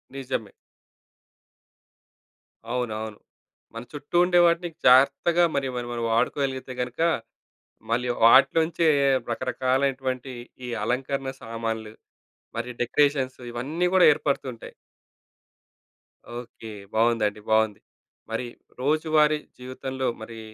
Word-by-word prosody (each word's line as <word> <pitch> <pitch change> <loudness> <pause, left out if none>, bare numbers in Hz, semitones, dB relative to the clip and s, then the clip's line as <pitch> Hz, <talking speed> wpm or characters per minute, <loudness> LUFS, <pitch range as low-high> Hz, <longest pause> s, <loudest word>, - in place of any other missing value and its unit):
నిజమే. 130 -6 -4 2.2
అవునవును. 110 -3 -3 0.6
మన 115 +1 -6
చుట్టూ 145 +3 -8
ఉండే 180 0 +4
వాటిని 170 +1 +2 0.2
జాగ్రత్తగా 140 +7 +5
మరి 135 -1 0
మరి 120 -1 -3
మనం 120 -1 -3
వాడుకోగలిగితే 130 +2 -1
గనుక 125 +4 -4 0.9
మళ్ళీ 120 +2 0 0.2
వాటిలోంచే 160 +7 +5 0.4
రకరకాలైనటువంటి 130 +1 -1 0.4
ఈ - - -5
అలంకరణ 135 +3 -2
సామాన్లు 115 -1 -4 0.6
మరియు 120 +1 -4
డెకరేషన్స్ 135 0 +1
ఇవన్నీ 145 +9 -2
గూడా 185 - +7
ఏర్పడుతూంటాయి. 135 -5 -3 1.7
ఓకే. 115 -2 -10 0.2
బావుందండి. 110 -2 +2
బావుంది. 110 -1 +2 0.5
మరి 120 +2 -2 0.4
రోజువారీ 155 +1 +2 0.2
జీవితంలో 130 +1 -4 0.2
మరి 115 0 -9
130 Hz, 90 wpm, -25 LUFS, 115-140 Hz, 2.2 s, గూడా